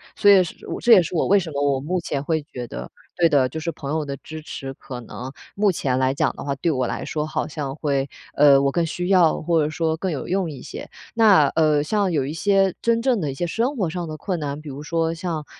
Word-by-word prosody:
所 205 -1 +5
以 195 - +7
是 175 - -6
我 - - -4
这 235 -1 +6
也 190 - +8
是 170 - -6
我 165 - +1
为 200 - +5
什 175 -4 -2
么 140 -1 -2
我 140 -2 +1
目 180 +5 -1
前 140 -4 -3
会 160 +1 0
觉 125 -4 -7
得 60 - -7 0.3
对 170 -1 +5
的， 140 -4 +3
就 160 - -5
是 170 +1 -3
朋 140 -1 -6
友 155 -1 -1
的 140 -1 -4
支 155 +2 -9
持 135 -3 -7
可 125 -2 -8
能 125 +2 -8 0.2
目 205 0 +2
前 130 -6 -1
来 130 0 +2
讲 140 - 0
的 - - -6
话， 140 -1 -1
对 160 +5 0
我 130 -3 0
来 - - -4
说 155 0 -2
好 - - -2
像 140 -3 -5
会， 140 -3 -1 0.3
呃， 140 -1 +6
我 140 0 +2
更 170 - +1
需 175 +3 -3
要， 180 -5 +4
或 165 0 +2
者 150 - -1
说 160 0 -1
更 185 +3 -2
有 140 -5 -4
用 185 -2 0
一 140 - -8
些。 - - -8 0.2
那， 210 -9 +6
呃， 155 -2 +2
像 200 +2 0
有 145 -5 0
一 145 - -4
些 195 +3 +2
真 230 0 +2
正 245 -7 +2
的 150 - -1
一 135 - -5
些 175 - -2
生 235 - -1
活 190 -5 0
上 175 +1 -4
的 155 0 -6
困 180 +1 -3
难， 145 -1 -4
比 150 - -12
如 140 +1 -7
说 165 +1 -1
像， 165 -2 -4
155 Hz, 290 characters per minute, -22 LUFS, 140-180 Hz, 0.3 s, 也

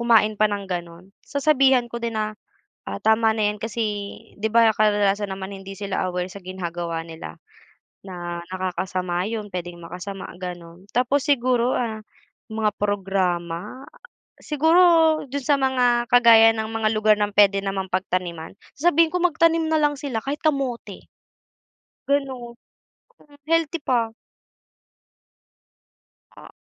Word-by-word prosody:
kumain 215 -3 +3
pa 215 - +5
ng 205 -1 -3
ganun. 175 +2 -6
Sasabihan 275 -3 +3
ko 235 - -4
din 230 -1 -3
na, 215 0 -1 0.5
ah, - - -6
tama 220 0 +3
na 215 -2 +1
yan 210 - -5
kasi, 225 +2 -4 0.6
'di 220 +2 -1
ba, 230 -1 +6
kadalasan 205 -1 +1
naman 190 0 -6
hindi 195 0 -9
sila 195 -1 -3
aware 180 0 -3
sa 195 0 -11
ginagawa 170 -3 -4
nila 160 - -10 0.6
na 175 -2 -6
nakakasama 185 -1 -2
yun, 215 -2 -4
puwedeng 175 -2 -6
makasama, 185 +3 -7
ganun. 175 0 -8
Tapos 255 +3 +1
siguro, 250 -3 +2
ah, 220 -3 -3 0.5
mga 215 -1 -1
programa. 190 +2 -2 0.5
Siguro 320 +1 +4
dun 275 0 -4
sa 285 0 +2
mga 245 -2 +2
kagaya 225 -2 +7
ng 220 0 -3
mga 225 -1 +1
lugar 215 0 +4
ng 205 -1 -1
puwede 200 -1 +5
namang 195 -1 -3
pagtaniman. 180 -3 -3 0.2
Sasabihin 330 +1 +3
ko 360 - +1
magtanim 330 -1 +2
na 320 - +2
lang 295 -2 +1
sila 250 -7 -4
kahit 285 +2 -3
kamote. 265 - -2 1.0
Gano'n. 260 -4 -2 0.6
Hmm, 290 -1 -21
healthy 330 0 +1
pa. 235 -5 0 2.3
Ah, - - -12
215 Hz, 135 wpm, -23 LUFS, 185-260 Hz, 2.3 s, kagaya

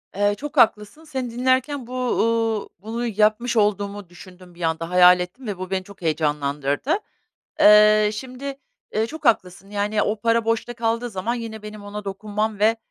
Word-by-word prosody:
Eee, 205 +1 +2
çok 295 +1 -7
haklısın. 215 +5 +2
Seni 265 -6 -4
dinlerken 255 +2 0
bu, 250 - -9
uuu, 230 -3 0
bunu 225 +5 -4
yapmış 220 +2 +1
olduğumu 205 -2 0
düşündüm 180 0 -15
bir 175 - -13
anda, 165 0 -1
hayal 180 0 +7
ettim 195 +8 -6
ve 200 -3 -3
bu 185 0 -6
beni 190 -1 -1
çok 200 -1 -15
heyecanlandırdı. 150 - 0 0.6
Eee, 210 0 +7
şimdi, 260 +4 -6 0.4
eee, 220 +1 +1
çok 315 +2 -9
haklısın, 190 -4 +1
yani, 210 +1 0
o 210 0 -1
para 230 0 +2
boşta 230 +1 -1
kaldığı 230 +1 -1
zaman 215 +4 -2
yine 225 -2 -6
benim 210 -1 -9
ona 205 0 -7
dokunmam 210 +1 -3
ve, 220 +2 +3
215 Hz, 165 wpm, -22 LUFS, 195-235 Hz, 0.6 s, hayal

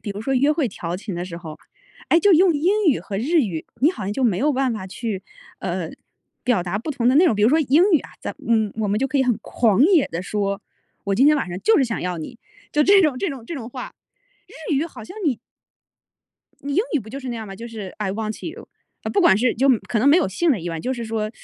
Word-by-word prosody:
比 - - -8
如 205 +1 -5
说 270 +4 -1
约 275 +3 +3
会 305 -2 +1
调 175 -2 -5
情 195 0 -6
的 175 - -3
时 170 -2 -7
候， 160 -3 -9 0.5
哎， 335 - +5
就 405 +2 +4
用 350 0 +5
英 380 +8 +1
语 280 - +3
和 195 -2 -5
日 315 +8 +2
语， 175 -9 -4 0.2
你 300 - +6
好 225 - -7
像 200 - -2
就 260 +3 -1
没 200 -6 +2
有 295 +7 +2
办 260 -1 +1
法 215 -4 -5
去， 195 0 -5 0.4
呃， - - -3 0.5
表 235 -8 +1
达 180 +3 -2
不 235 - -5
同 250 -4 -1
的 255 - +5
那 350 +4 +6
种 240 - +3
比 205 - -1
如 220 - +5
说 315 +3 +4
英 295 +3 +4
语 320 - +6
啊， - - -12
咱 - - -4
嗯， 220 -3 +2
我 215 -2 0
们 205 +1 +1
就 270 - +1
可 275 +1 -1
以 - - +4
很 250 -4 +1
狂 225 -1 +2
野 340 -4 +4
地 165 +2 -4
说， 200 0 -2 0.4
我 200 - 0
今 260 +8 +4
天 300 0 +5
晚 280 - -1
上 175 - -4
就 445 - +4
是 275 - +4
想 230 -2 -3
要 180 0 -3
你， 165 +9 -8 0.3
就 300 - +3
这 390 +3 +6
种 290 -6 +1
这 395 - -1
种 270 -6 -7
这 330 - -6
种 245 -6 -6
话， 250 0 -7 0.5
日 315 -1 -5
语 300 +4 0
好 265 -9 -11
像 295 - -11
你 255 -7 +1 1.2
你 285 0 -4
英 395 - +3
语 290 - +2
不 220 - -12
就 270 +5 -6
是 260 - -7
那 240 - -3
样 220 -1 -6
吗？ 195 - -8
就 230 - -8
是 210 -5 -8
i 210 -3 -1
want 215 0 -4
you。 330 - -8 0.3
啊 - - -3
不 405 - +2
管 265 - +6
是 235 +3 +1
就 270 +4 +2 0.2
可 235 - 0
能 250 +6 +4
没 295 - +7
有 360 - +3
性 320 - +1
的 255 - +2
意味， 165 -1 -4
就 255 - -2
是 235 -2 -5
说 220 -1 -2
240 Hz, 310 characters per minute, -22 LUFS, 205-295 Hz, 1.2 s, 没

